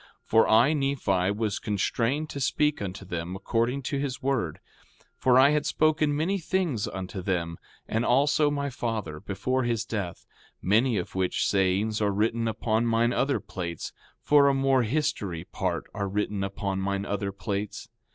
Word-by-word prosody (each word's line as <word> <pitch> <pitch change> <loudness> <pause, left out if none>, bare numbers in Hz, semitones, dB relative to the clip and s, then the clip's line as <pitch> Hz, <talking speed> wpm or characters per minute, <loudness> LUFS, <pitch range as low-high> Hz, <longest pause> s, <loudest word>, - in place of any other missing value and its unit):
4:14 - - -23 0.2
For 115 0 +4
I, 115 +7 +5
Nephi, 125 -11 +1
was 105 -3 -1
constrained 115 +8 0
to 140 - -5
speak 150 +1 +1
unto 95 0 -5
them, 85 0 -4
according 115 +7 -1
to 140 +2 -2
his 135 -3 -3
word; 130 - -1 0.6
for 125 -1 +3
I 135 +2 +7
had 150 -1 +1
spoken 155 -1 +2
many 185 +6 0
things 170 - -1
unto 95 0 -5
them, 85 -3 -2 0.3
and 110 +2 0
also 145 +4 +3
my 140 -1 -2
father, 110 -11 -3
before 115 +10 -1
his 120 -3 -1
death; 100 -6 -4 0.3
many 110 +5 +2
of 90 - -4
which 95 -1 0
sayings 100 +3 +1
are 105 - +3
written 115 +3 0
upon 110 +1 0
mine 115 +1 +2
other 135 0 +1
plates; 85 -4 -6 0.3
for 145 -1 +5
a 140 - +3
more 135 -1 +3
history 110 - -1
part 90 -2 -2
are 100 -2 -2
written 100 0 -1
upon 95 0 -3
mine 100 +1 -1
other 100 -1 -2
plates. 100 0 -4
110 Hz, 165 wpm, -27 LUFS, 100-135 Hz, 0.6 s, I